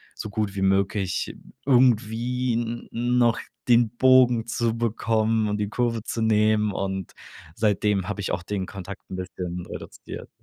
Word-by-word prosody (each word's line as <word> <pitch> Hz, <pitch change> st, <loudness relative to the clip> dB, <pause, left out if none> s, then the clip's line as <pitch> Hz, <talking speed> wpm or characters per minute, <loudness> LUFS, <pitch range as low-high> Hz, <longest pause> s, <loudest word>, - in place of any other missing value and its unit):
so 110 Hz, -, -6 dB
gut 105 Hz, -1 st, -2 dB
wie 95 Hz, -, -2 dB
möglich 95 Hz, 0 st, 0 dB, 0.3 s
irgendwie 125 Hz, -1 st, +2 dB
n 120 Hz, 0 st, -3 dB, 0.3 s
noch 120 Hz, -2 st, +3 dB, 0.3 s
den 120 Hz, -1 st, +4 dB
Bogen 125 Hz, -3 st, +5 dB
zu 115 Hz, 0 st, 0 dB
bekommen 110 Hz, -1 st, +1 dB
und 105 Hz, -, -1 dB
die 105 Hz, -1 st, -1 dB
Kurve 115 Hz, 0 st, 0 dB
zu 115 Hz, -, -3 dB
nehmen 110 Hz, -1 st, +3 dB
und 95 Hz, -1 st, -3 dB, 0.4 s
seitdem 105 Hz, -2 st, +1 dB
habe 105 Hz, 0 st, -3 dB
ich 95 Hz, -, -2 dB
auch 90 Hz, -, -1 dB
den 95 Hz, 0 st, -3 dB
Kontakt 95 Hz, 0 st, -8 dB
'n -, -, -3 dB
bisschen 90 Hz, -1 st, -5 dB
reduziert. -, -, -9 dB
110 Hz, 150 wpm, -25 LUFS, 100-115 Hz, 0.4 s, Bogen